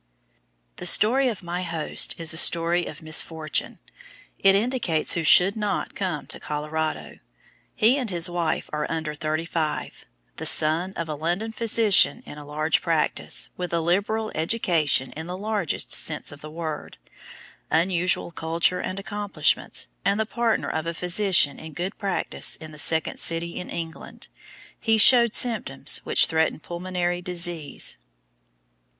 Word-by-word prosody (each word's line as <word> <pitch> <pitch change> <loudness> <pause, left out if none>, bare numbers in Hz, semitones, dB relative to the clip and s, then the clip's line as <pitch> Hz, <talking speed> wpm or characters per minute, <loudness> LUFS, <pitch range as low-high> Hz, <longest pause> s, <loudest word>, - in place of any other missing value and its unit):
The - - -2
story 260 +5 +5
of 210 -5 -6
my 175 +1 -4
host 165 -3 -3
is 165 -1 0
a - - -3
story 170 +1 +3
of 155 - -10
misfortune. 155 -1 0 0.6
It 195 0 +5
indicates 205 -8 +1
who 170 - -1
should 180 +5 +7
NOT 210 -2 -3
come 180 -7 -4
to - - -5
Colorado. 155 +1 -4 0.6
He 240 +6 +3
and 250 -5 -3
his 170 -3 0
wife 175 -2 -2
are 150 0 -2
under 160 -2 -3
thirty 155 +2 -3
five. 160 -2 -4 0.3
The - - -6
son 165 +5 +3
of 170 -3 -5
a 155 - -4
London 175 +9 -3
physician 225 +1 +2
in 150 - -10
large 155 +2 -1
practice, 165 -3 0
with 180 -1 -4
a 170 - +1
liberal 205 +6 -1
education 160 - 0
in 160 +2 -8
the 180 +1 -5
largest 205 -4 -1
sense - - +1
of 145 0 -12
the 155 - -9
word, 155 -1 -6 0.7
unusual 175 +1 +1
culture 165 +2 0
and 185 - -4
accomplishments, 205 0 -1 0.2
and 200 +2 +1
the 220 - +1
partner 235 0 -1
of 160 +1 -3
a 170 - -3
physician 180 -3 +2
in 160 -1 -10
good 180 +7 -4
practice 195 -4 -1
in 155 -1 -9
the 155 - -8
second 160 +1 +2
city 170 +1 +2
in 180 - -8
England, 165 -1 -8 0.5
he 225 -1 +2
showed 235 +1 +6
symptoms 170 - +3
which - - +4
threatened 160 -1 -1
pulmonary 175 0 -3
disease. 175 -4 -2
170 Hz, 150 wpm, -24 LUFS, 160-195 Hz, 0.7 s, should